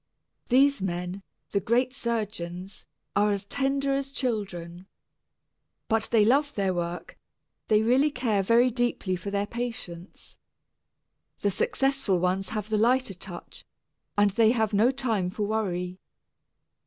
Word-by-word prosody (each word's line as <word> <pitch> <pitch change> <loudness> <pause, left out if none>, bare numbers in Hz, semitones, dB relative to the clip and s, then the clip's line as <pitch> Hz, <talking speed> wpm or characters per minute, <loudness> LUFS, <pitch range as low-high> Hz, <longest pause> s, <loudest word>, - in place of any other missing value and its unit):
These 275 -1 +4
men 180 +1 -3 0.3
the 200 - +2
great 245 +6 +1
surgeons 205 -7 -4 0.3
are 205 +1 +4
as 200 -1 -1
tender 275 +4 0
as 275 0 -2
children. 190 -9 -3 1.0
But 220 -1 +1
they 220 -3 +4
love 285 +5 +2
their 195 -2 +1
work, 175 -1 -4 0.5
they 215 0 +4
really 260 +6 +4
care 240 -7 0
very 235 +5 +4
deeply 240 -6 0
for 185 +3 -5
their 200 0 0
patients. 220 -7 -7 1.0
The 200 - +2
successful 270 0 +1
ones 185 +2 0
have 215 -1 -4
the 215 -1 +1
lighter 245 -1 +3
touch 180 -1 -9 0.5
and 205 0 +4
they 220 +2 +4
have 220 -3 0
no 215 +5 +5
time 230 -9 -1
for 210 +3 -3
worry. 185 -4 -2
210 Hz, 130 wpm, -27 LUFS, 190-245 Hz, 1.0 s, no